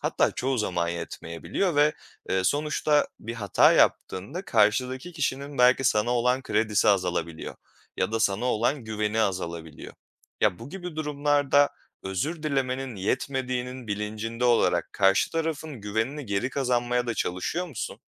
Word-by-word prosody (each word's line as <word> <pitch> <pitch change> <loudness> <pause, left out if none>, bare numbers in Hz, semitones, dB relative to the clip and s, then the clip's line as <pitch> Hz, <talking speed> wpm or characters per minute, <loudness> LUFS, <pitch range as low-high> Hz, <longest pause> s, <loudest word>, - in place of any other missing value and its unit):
Hatta - - +1
çoğu 130 0 -1
zaman 90 -5 0
yetmeyebiliyor 85 - -3
ve, 150 +1 +5 0.4
eee, 95 0 +1
sonuçta 150 +4 +2
bir 115 +1 -6
hata 100 -5 +4
yaptığında 140 - +1
karşıdaki 125 - +1
kişinin 140 -3 -3
belki 125 +1 +5
sana 110 -1 +2
olan 125 +2 +2
kredisi 105 -4 +1
azalabiliyor 90 -4 0 0.4
ya - - -1
da 115 - 0
sana 100 +1 +1
olan 125 +2 0
güveni 110 0 -1
azalabiliyor. 85 -6 -3 0.5
Ya, 90 - +2
bu 115 +4 -9
gibi 180 -4 -7
durumlarda 145 -1 +2 0.3
özür 145 - -3
dilemenin 135 -4 -1
yetmediğinin 125 +3 -2
bilincinde 110 +3 -3
olarak 120 -1 +2
karşı 95 -1 +3
tarafın 160 -5 -3
güvenini 110 +8 -2
geri 100 +5 -1
kazanmaya 125 -2 0
da 115 - -1
çalışıyor 125 - -2
musun? 145 -9 -6
125 Hz, 130 wpm, -26 LUFS, 105-140 Hz, 0.5 s, ve